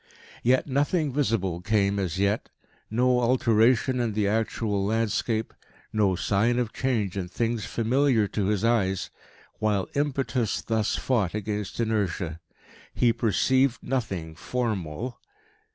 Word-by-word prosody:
Yet 130 +2 +3
nothing 145 +2 0
visible 105 - 0
came 100 0 +1
as 95 -2 -2
yet, 100 +2 0 0.4
no 125 +2 +2
alteration 120 +1 +3
in 115 -3 0
the 105 -1 +1
actual 105 -1 0
landscape, 110 +1 0 0.4
no 100 -4 +2
sign 105 +6 +1
of 120 -3 -1
change 110 -8 -1
in 95 -2 -3
things 115 +3 -2
familiar 120 -1 +2
to 100 -3 -1
his 105 +1 +1
eyes, 95 -5 +1 0.5
while 105 -3 +1
impetus 135 -5 0
thus 110 -2 0
fought 110 -8 0
against 105 -1 -4
inertia. 100 -7 -1 0.6
He 120 -2 +3
perceived 130 +4 +2
nothing 95 -11 -3
form 110 -2 -2
al. 120 +11 -6
110 Hz, 125 wpm, -26 LUFS, 100-125 Hz, 0.6 s, Yet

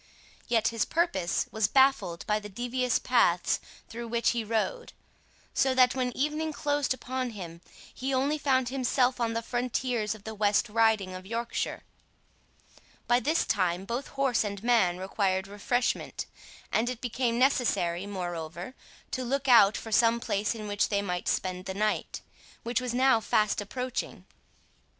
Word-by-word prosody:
Yet 225 -2 +2
his 230 -1 0
purpose 325 - 0
was 220 -1 +1
baffled 265 -11 +2
by 210 -1 +1
the 210 0 -9
devious 245 +3 0
paths 180 -9 +2 0.3
through 235 +1 -7
which 235 0 +1
he 235 -1 -2
rode, 230 - -2 0.6
so 265 -1 +2
that 255 -1 +5
when 255 -1 -1
evening 300 +3 -1
closed 290 -1 -1
upon 260 0 -3
him, 170 -3 -8 0.3
he 265 +2 -3
only 275 +3 +1
found 260 -4 +2
himself 255 -1 +1
on 230 -1 0
the 230 0 -2
frontiers 240 -3 -1
of 210 - -15
the 220 - -6
West 210 +2 +2
Riding 220 -4 +2
of 185 +1 -8
Yorkshire. 230 +2 -3 1.2
By 240 0 +3
this 310 +7 +1
time 185 -2 0
both 240 +5 -3
horse 270 -5 +1
and 200 -1 -5
man 225 -8 +3
required 190 0 -1
refreshment, 210 +5 -1 0.5
and 230 +3 +1
it 250 -2 -5
became 240 -1 -1
necessary, 205 -9 +1
moreover, 175 +1 -5 0.4
to 255 - -2
look 270 +3 -1
out 225 -5 +7
for 225 - -8
some 230 +1 +4
place 205 -1 -1
in 215 -2 -6
which 205 0 0
they 200 -1 0
might 180 -2 -3
spend 185 0 -1
the 190 - -5
night, 215 +1 -1 0.4
which 235 +2 -1
was 245 -1 -3
now 260 -2 +4
fast 215 -1 +1
approaching. 250 +5 -4
230 Hz, 155 wpm, -28 LUFS, 200-255 Hz, 1.2 s, out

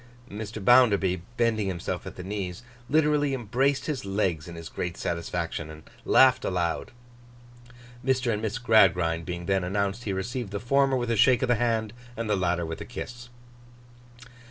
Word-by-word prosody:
Mr. 110 +1 -6
Bounderby, 100 -8 +5 0.2
bending 110 -3 +1
himself 90 -3 -4
at - - -8
the 90 - -8
knees, 95 0 -5 0.3
literally 150 -2 +2
embraced 130 +4 0
his 150 -4 -3
legs 95 -5 -1
in 85 - -8
his 85 -1 -8
great 85 +1 -4
satisfaction 85 -1 -3
and 80 0 -11 0.2
laughed 130 -1 +5
aloud. 85 -3 -1 1.1
Mr. 130 -2 +1
and 105 - -3
Miss 110 +1 -2
Gradgrind 95 -8 +3
being 85 -1 -4
then 95 0 +1
announced, 100 +4 -2
he 100 - -1
received 105 +4 -3
the 100 +1 -4
former 135 +3 +2
with 120 -1 -1
a - - +2
shake 125 +4 +4
of 130 - 0
the - - +5
hand, 115 -2 0 0.2
and 115 -1 -3
the 105 - +2
latter 90 -2 0
with 80 0 -6
a - - -3
kiss. 120 0 -8
105 Hz, 170 wpm, -27 LUFS, 90-120 Hz, 1.1 s, Bounderby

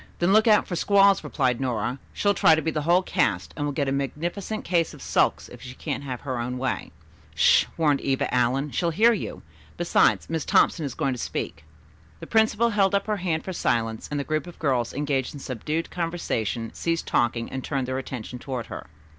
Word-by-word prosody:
"Then 175 +3 +2
look 215 +2 +5
out 215 -1 +5
for 175 - -3
squalls," 200 +2 +4
replied 130 -3 0
Nora. 125 0 -2
"She'll 205 0 +1
try 160 -4 +5
to 160 - -1
be 160 - 0
the 155 - -2
whole 175 +4 +3
cast, 95 - 0
and 145 - -2
will - - -1
get 140 0 -1
a - - 0
magnificent 170 +10 -3
case 170 -2 +1
of - - -14
sulks - - +1
if - - -13
she 130 0 -9
can't 145 0 -4
have 130 -3 -5
her 130 -4 -3
own 125 +2 -3
way." 130 0 -3 0.4
"Sh - - +5
h - - -20
h," - - -26
warned 150 -4 +2
Eva 135 -1 -1
Allen. 130 +4 +1
"She'll 170 - 0
hear 220 +8 +4
you. 210 - -5 0.3
Besides, 175 0 +3
Miss 160 -2 -2
Thompson 160 - +3
is 130 - -7
going 135 - 0
to 125 - -6
speak." 75 - -4 0.5
The - - -8
principal 220 +1 +2
held 200 -2 +2
up 200 - +1
her 215 -1 -1
hand 170 -4 -1
for 190 - -5
silence 115 -8 -1
and 145 - -2
the - - -1
groups 155 +3 -2
of 175 - -11
girls 130 -6 0
engaged 140 -2 -2
in - - -7
subdued 150 +6 -3
conversation 125 - -2
ceased 165 0 -2
talking 120 -1 0
and 130 -1 -4
turned 135 -3 -2
their 130 +1 -2
attention 125 -2 -7
toward 125 -3 -4
her. - - -8
145 Hz, 220 wpm, -25 LUFS, 130-175 Hz, 0.5 s, look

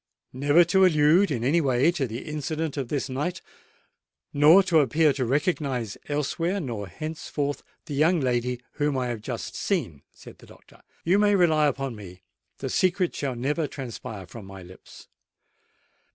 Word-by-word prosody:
"Never 145 +6 +4
to 190 +3 +3
allude 165 +2 +4
in 120 -6 -2
any 155 +7 +3
way 135 +2 +3
to 140 -6 -2
the 115 +3 -6
incident 155 0 -3
of 135 -4 -3
this 140 +1 -2
night, 150 +8 -3 0.9
nor 155 +7 +7
to 175 -4 +3
appear 150 +2 +3
to 130 -2 -2
recognise 135 - -1
elsewhere 165 +6 -1
nor 115 - -5
henceforth 145 - -4 0.2
the - - -6
young 160 +5 +3
lady 125 -2 -1 0.2
whom 145 -2 +1
I 125 -1 -1
have 115 -3 -4
just - - -5
seen," 75 -4 -2
said - - -15
the - - -16
doctor. - - -19 0.2
"You 185 +4 +3
may 205 -1 +4
rely 160 -5 +4
upon 135 -3 -3
me: 95 -3 -12 0.3
the - - -5
secret 185 -1 +1
shall 135 -3 -3
never 145 +6 -1
transpire 120 -7 -7
from 100 +3 -11
my 95 -1 -10
lips." 90 +1 -15
145 Hz, 165 wpm, -25 LUFS, 125-160 Hz, 0.9 s, nor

